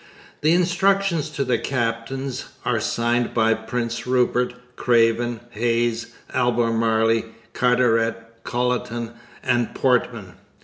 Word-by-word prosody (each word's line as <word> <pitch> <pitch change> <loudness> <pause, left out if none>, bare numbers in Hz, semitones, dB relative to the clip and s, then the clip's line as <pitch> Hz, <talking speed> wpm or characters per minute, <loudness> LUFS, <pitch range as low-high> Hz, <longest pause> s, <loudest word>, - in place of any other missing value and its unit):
The 155 +2 +3
instructions 180 -2 +2
to 140 -2 -2
the 120 -2 +1
captains 130 +1 -3 0.2
are - - +1
signed 120 +1 0
by 115 -1 +4
Prince 115 +2 -4
Rupert, 125 -1 +1 0.2
Craven, 115 0 +2
Hayes, 115 0 -1 0.2
Albemarle, 115 -2 +2 0.3
Carteret, 120 -2 +2 0.3
Colleton, 120 -1 -2 0.3
and 120 -1 0
Portman. 120 -7 0
120 Hz, 95 wpm, -22 LUFS, 115-125 Hz, 0.3 s, by